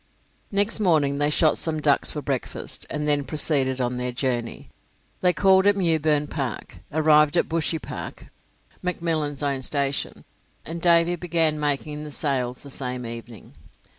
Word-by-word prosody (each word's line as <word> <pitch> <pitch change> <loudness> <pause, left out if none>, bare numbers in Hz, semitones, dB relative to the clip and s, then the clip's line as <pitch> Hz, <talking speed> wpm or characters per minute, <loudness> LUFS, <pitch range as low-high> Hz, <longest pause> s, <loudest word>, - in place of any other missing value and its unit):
Next 205 +2 +1
morning 150 -8 +2
they 145 0 +2
shot 155 +1 +3
some 160 -1 -2
ducks 145 -2 +2
for 150 - -5
breakfast, 135 -2 -4
and 150 0 -3
then 145 -1 +2
proceeded 135 -3 +2
on 125 0 -1
their 125 0 -2
journey. 120 -1 -3 0.5
They 180 - +4
called 190 +1 +4
at 205 - +5
Mewburn 160 -5 +1
Park, 130 - -5
arrived 150 +1 +4
at - - +2
Bushy 165 0 0
Park - - -8 0.6
(McMillan's 160 -5 -2
own 140 -2 -1
station), 140 +1 -2 0.4
and 165 +1 -6
Davy 170 0 +4
began 165 -3 0
making 150 +1 -2
the 150 - -7
sails 130 -4 -1
the 140 - -9
same 125 -2 -3
evening. 115 -3 -9
150 Hz, 150 wpm, -24 LUFS, 135-165 Hz, 0.6 s, at